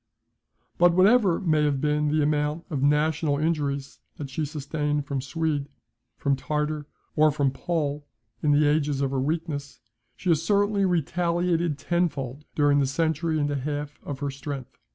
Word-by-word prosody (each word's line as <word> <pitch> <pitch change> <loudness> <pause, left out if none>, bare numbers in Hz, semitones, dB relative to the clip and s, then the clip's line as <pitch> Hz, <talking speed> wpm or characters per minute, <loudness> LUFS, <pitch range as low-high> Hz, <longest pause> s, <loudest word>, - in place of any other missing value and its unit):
But 175 0 +6
whatever 195 -1 +5
may 155 -4 +2
have 145 -2 +1
been 150 +1 +1
the 150 +1 +2
amount 150 +2 0
of 140 -4 -1
national 150 +1 +2
injuries 145 -3 -1 0.2
that 140 -3 -7
she 155 +3 -1
sustained 150 0 -2
from 140 -2 -2
Swede, 145 0 -2 0.5
from 140 -1 +1
Tartar, 150 +1 -2 0.3
or 155 0 +5
from 140 -2 +1
Pole 145 -1 -2 0.3
in 150 - +2
the 145 +1 +4
ages 145 -2 +1
of 135 -1 0
her 135 -1 0
weakness, 150 -1 -3 0.4
she 185 - -3
has 160 -2 +3
certainly 200 +2 +2
retaliated 170 -1 0
ten 175 +4 +1
fold 135 +1 -7
during 145 -1 +4
the 140 - +2
century 160 +3 0
and 145 0 0
a - - -1
half 145 +1 -4
of 145 - -5
her 140 -1 -1
strength. 140 -1 -7
150 Hz, 165 wpm, -26 LUFS, 140-165 Hz, 0.5 s, But